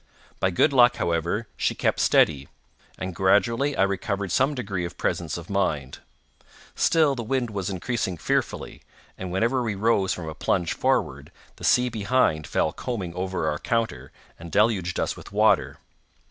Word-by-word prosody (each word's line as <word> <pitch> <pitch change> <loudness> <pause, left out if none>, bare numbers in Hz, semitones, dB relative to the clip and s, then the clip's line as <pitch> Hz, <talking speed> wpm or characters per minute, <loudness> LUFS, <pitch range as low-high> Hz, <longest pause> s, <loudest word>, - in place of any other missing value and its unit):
By 95 - +2
good 140 - +2
luck, 120 -1 +6
however, 85 +6 -1
she - - 0
kept - - 0
steady, 70 -3 +3 0.5
and 95 0 -5
gradually 105 - +2
I - - +4
recovered 100 0 -2
some 135 +7 +2
degree 100 -8 -3
of 85 - -6
presence 85 -3 -2
of 85 0 -9
mind. 75 -9 -1 0.7
Still 155 -4 +3
the 125 - -4
wind 120 0 -1
was 100 -3 -3
increasing 95 -1 -2
fearfully, - - -2 0.3
and 95 -1 -6
whenever 115 +7 +1
we 110 -4 -2
rose 100 -2 +2
from 85 -3 -4
a 80 - -5
plunge 85 +1 0
forward, - - -1 0.3
the - - -13
sea 125 0 +4
behind 110 -8 +1
fell - - 0
combing 100 -9 -4
over 90 -2 -2
our 75 0 -1
counter, 115 -1 -2 0.3
and 85 0 -9
deluged 95 -3 +1
us - - -1
with - - -12
water. - - +2
100 Hz, 160 wpm, -25 LUFS, 85-115 Hz, 0.7 s, luck